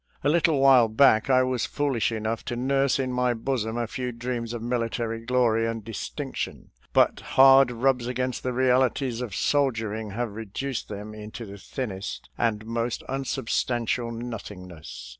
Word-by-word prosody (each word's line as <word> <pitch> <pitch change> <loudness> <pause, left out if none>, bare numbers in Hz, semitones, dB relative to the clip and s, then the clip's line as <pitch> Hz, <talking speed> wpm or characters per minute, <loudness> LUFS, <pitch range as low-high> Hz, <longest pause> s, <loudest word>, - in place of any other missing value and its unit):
A 145 - +3
little 160 -2 +3
while 135 -4 +6
back 110 +1 +4
I 130 -1 +5
was 130 -2 -1
foolish 135 -7 0
enough 110 0 -2
to 120 - -3
nurse 135 +2 +1
in 130 -2 -1
my 125 -1 +1
bosom 115 -1 -2
a 120 - 0
few 125 +2 -4
dreams 120 -1 -4
of 120 -1 -5
military 115 -1 -2
glory 115 -2 +2
and 115 -1 -4
distinction, 115 - -5 0.2
but - - +3
hard 135 0 +6
rubs 125 0 +1
against 125 0 -2
the 125 - -2
realities 130 -1 +1
of 115 -7 -5
soldiering 115 -6 0
have 115 +2 -3
reduced 115 +5 -5
them 105 +1 -7
into 110 +2 -8
the 100 0 -10
thinnest 100 -4 -6
and 110 -2 -1
most 115 +1 -2
unsubstantial 120 -2 -1
nothingness. 100 - -8
120 Hz, 155 wpm, -26 LUFS, 110-130 Hz, 0.2 s, while